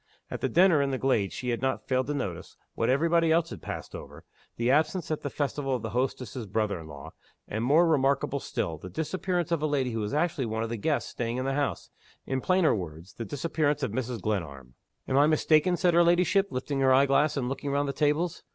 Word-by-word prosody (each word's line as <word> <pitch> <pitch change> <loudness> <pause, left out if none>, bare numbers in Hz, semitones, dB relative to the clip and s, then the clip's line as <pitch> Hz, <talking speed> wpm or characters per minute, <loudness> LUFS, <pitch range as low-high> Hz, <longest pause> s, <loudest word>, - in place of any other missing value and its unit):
At - - -5
the - - 0
dinner 175 -4 +5
in 140 - 0
the 135 - -1
glade 115 -8 +1
she 125 - -4
had 120 -1 -1
not 130 0 -2
failed 130 -1 +1
to 145 - -2
notice 90 -11 -5 0.2
what 115 - 0
every 140 +6 +3
body 165 -1 +3
else 165 0 +2
had - - -8
passed - - -7
over - - -10 0.3
the 120 +2 +1
absence 160 +4 +1
at 155 - -2
the 145 - -3
festival 140 -1 -2
of 120 - -5
the 110 - -4
hostess's 125 -2 -3
brother 100 -2 -1
in 80 - -10
law; 70 -2 -10 0.4
and 110 +2 -3
more 155 +7 +4
remarkable 140 -2 +1
still, 80 - -3
the 90 - -9
disappearance 175 - -2
of 165 -3 +1
a 155 - +1
lady 135 -4 0
who 115 - -3
was 105 -1 -3
actually 150 -5 0
one 110 0 -2
of 115 - -4
the 115 - -2
guests 145 +8 -1
staying 120 0 -3
in 130 - -2
the 135 - 0
house: 145 0 -2 0.3
in 130 0 -2
plainer 185 0 +3
words, 85 -2 -6
the 115 - -6
disappearance 150 0 -1
of 125 - -1
Mrs. 125 0 -3
Glenarm. 70 -12 -4 0.3
"Am 130 - +1
I 145 - +5
mistaken?" 155 +3 +3
said 175 -1 +2
her 170 +1 +6
ladyship, 180 +3 +3
lifting 135 +1 -3
her 135 -1 +4
eye 135 +2 +6
glass, 140 +2 +2
and 125 -3 -1
looking 135 +2 -4
round 140 +1 0
the 140 - -2
tables. 155 +4 0
135 Hz, 235 wpm, -28 LUFS, 115-155 Hz, 0.4 s, her